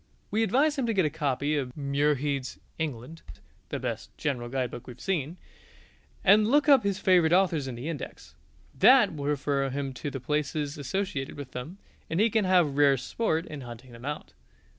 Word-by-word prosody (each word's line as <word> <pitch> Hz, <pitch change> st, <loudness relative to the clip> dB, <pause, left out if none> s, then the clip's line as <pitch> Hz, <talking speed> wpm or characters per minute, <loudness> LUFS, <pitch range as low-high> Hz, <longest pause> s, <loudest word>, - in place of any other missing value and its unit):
We 215 Hz, -, +1 dB
advise 275 Hz, +8 st, +2 dB
him 250 Hz, -, 0 dB
to 225 Hz, -, 0 dB
get 185 Hz, -4 st, +3 dB
a 150 Hz, -, 0 dB
copy 145 Hz, -1 st, -1 dB
of 130 Hz, -2 st, -3 dB
Muirhead's 140 Hz, -1 st, 0 dB, 0.2 s
"England" 155 Hz, +1 st, -5 dB, 0.5 s
(the -, -, -2 dB
best -, -, -4 dB
general 125 Hz, -5 st, -2 dB
guidebook 125 Hz, -2 st, -3 dB
we 125 Hz, -, -7 dB
have 120 Hz, -, -22 dB
seen) 170 Hz, -3 st, -2 dB, 0.9 s
and 210 Hz, +2 st, +6 dB
look 290 Hz, +5 st, +3 dB
up 275 Hz, -5 st, +6 dB
his 200 Hz, -1 st, 0 dB
favourite 180 Hz, -5 st, +4 dB
authors 175 Hz, -6 st, +2 dB
in 130 Hz, -, -5 dB
the 120 Hz, +6 st, -6 dB
index. 160 Hz, -5 st, -7 dB, 0.4 s
That -, -, +6 dB
will 145 Hz, -2 st, -5 dB
refer 140 Hz, -1 st, 0 dB
him 135 Hz, 0 st, -3 dB
to 145 Hz, -, -5 dB
the 135 Hz, -, -5 dB
places 150 Hz, +2 st, -2 dB
associated 145 Hz, -2 st, -3 dB
with 140 Hz, -3 st, -8 dB
them, 140 Hz, +10 st, -7 dB, 0.3 s
and 165 Hz, -, -1 dB
he 220 Hz, +1 st, +4 dB
can 220 Hz, -2 st, +2 dB
have 175 Hz, -7 st, +3 dB
rare 140 Hz, -2 st, +5 dB
sport 160 Hz, -, -1 dB
in 150 Hz, -4 st, -8 dB
hunting 120 Hz, +1 st, -10 dB
them 115 Hz, 0 st, -12 dB
out. 150 Hz, +1 st, -5 dB
150 Hz, 185 wpm, -28 LUFS, 135-185 Hz, 0.9 s, and